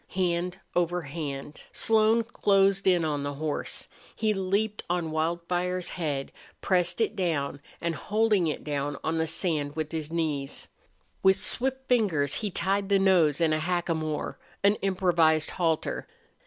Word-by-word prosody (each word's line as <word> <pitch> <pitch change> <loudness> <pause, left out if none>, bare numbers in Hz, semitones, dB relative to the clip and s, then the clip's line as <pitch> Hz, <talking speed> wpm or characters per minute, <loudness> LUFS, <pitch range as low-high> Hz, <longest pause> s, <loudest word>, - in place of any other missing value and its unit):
Hand 180 0 0 0.2
over 175 0 +1
hand 145 -1 -6
Slone 225 +1 +3
closed 195 -4 +2
in 175 -3 +4
on 145 -2 -1
the 145 0 -3
horse. 150 +1 -3 0.3
He 215 -1 +1
leaped 200 +2 -1
on 175 -2 -1
Wildfire's 175 +3 -1
head, 145 -6 -3 0.3
pressed 180 0 +1
it 225 -1 +1
down, 145 -7 -1 0.2
and, 170 -1 -1
holding 210 -1 +1
it 150 - -3
down 145 -1 -2
on 160 +1 0
the 160 - +1
sand 155 -3 -1
with 155 -1 -3
his 160 -2 -4
knees, 150 -5 -2 0.5
with 190 0 +6
swift 265 +5 0
fingers 175 - +2
he 210 +7 -2
tied 195 +1 0
the 200 - +5
nose 180 -7 +4
in 165 -2 +3
a 155 - +1
hackamore 160 -2 -2 0.2
an 200 +1 +6
improvised 175 -5 +2
halter. 165 -3 -1
175 Hz, 145 wpm, -27 LUFS, 155-195 Hz, 0.5 s, with